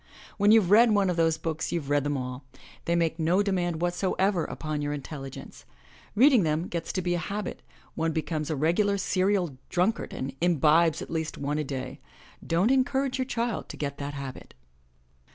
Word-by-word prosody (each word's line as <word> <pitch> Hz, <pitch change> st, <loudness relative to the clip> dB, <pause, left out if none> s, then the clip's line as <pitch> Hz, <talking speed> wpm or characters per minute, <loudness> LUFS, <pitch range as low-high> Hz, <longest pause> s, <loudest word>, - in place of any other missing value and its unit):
When 205 Hz, +1 st, +4 dB
youVe 215 Hz, -5 st, +5 dB
read 230 Hz, +3 st, +7 dB
one 195 Hz, -2 st, +3 dB
of -, -, -2 dB
those 165 Hz, -1 st, +2 dB
books 160 Hz, -1 st, -3 dB
you've 150 Hz, -5 st, -3 dB
read 145 Hz, -1 st, +3 dB
them 145 Hz, -1 st, -1 dB
all. 125 Hz, +1 st, -5 dB, 0.4 s
They 170 Hz, -, +1 dB
make 165 Hz, -1 st, 0 dB
no 175 Hz, +5 st, +2 dB
demand 175 Hz, -4 st, -1 dB
whatsoever 185 Hz, +1 st, +1 dB
upon 155 Hz, -2 st, -4 dB
your 145 Hz, 0 st, -2 dB
intelligence. 135 Hz, -2 st, -8 dB, 0.5 s
Reading 255 Hz, +1 st, +6 dB
them 160 Hz, +1 st, 0 dB
gets 170 Hz, -1 st, -3 dB
to 185 Hz, -, -2 dB
be 175 Hz, 0 st, 0 dB
a 175 Hz, -, 0 dB
habit 205 Hz, +2 st, -4 dB, 0.2 s
— -, -, -29 dB
one 165 Hz, 0 st, -1 dB
becomes 155 Hz, -1 st, -2 dB
a 155 Hz, -, 0 dB
regular 175 Hz, +8 st, +2 dB
serial 185 Hz, -7 st, 0 dB
dnmkard 190 Hz, +6 st, 0 dB
and 135 Hz, +1 st, -5 dB
imbibes 165 Hz, -1 st, +3 dB
at -, -, -10 dB
least 160 Hz, -1 st, -3 dB
one 145 Hz, +2 st, -2 dB
a -, -, 0 dB
day. 130 Hz, -2 st, -5 dB, 0.4 s
Dcm't 180 Hz, +8 st, +2 dB
encourage 270 Hz, 0 st, +1 dB
your 260 Hz, -, 0 dB
child 235 Hz, -3 st, -2 dB
to -, -, -8 dB
get 140 Hz, -1 st, -4 dB
that 145 Hz, 0 st, -5 dB
habit. 135 Hz, -2 st, -8 dB
170 Hz, 190 wpm, -27 LUFS, 150-195 Hz, 0.5 s, read